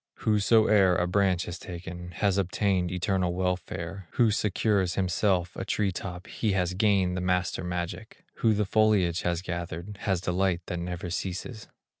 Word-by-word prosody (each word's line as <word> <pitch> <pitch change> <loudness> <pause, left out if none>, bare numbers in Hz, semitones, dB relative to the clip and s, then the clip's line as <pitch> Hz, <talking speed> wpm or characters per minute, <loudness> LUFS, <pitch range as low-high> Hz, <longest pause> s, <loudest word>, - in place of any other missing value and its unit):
Whosoe'er 105 -3 +4
a 90 - +1
branch 95 -1 +1
has 90 - -6
taken, 90 0 -7
Has 100 +1 +1
obtained 95 -1 0
eternal 90 -1 0
welfare; 90 0 -3
Who 115 -3 +4
secures 100 -2 +1
himself 90 -1 +1
a - - -4
tree 100 -2 0
top, 90 0 -6
He 110 -3 -1
has 90 -1 0
gained 95 -2 +2
the 90 - -2
master 90 -1 0
magic; 90 -1 -5
Who 110 -2 +3
the 105 0 +1
foliage 100 -5 +2
has 85 0 -1
gathered, 85 +2 -5
Has 95 -3 0
delight 90 0 0
that 90 - -4
never 90 0 -4
ceases. 95 +5 -4
90 Hz, 155 wpm, -28 LUFS, 90-100 Hz, -, Whosoe'er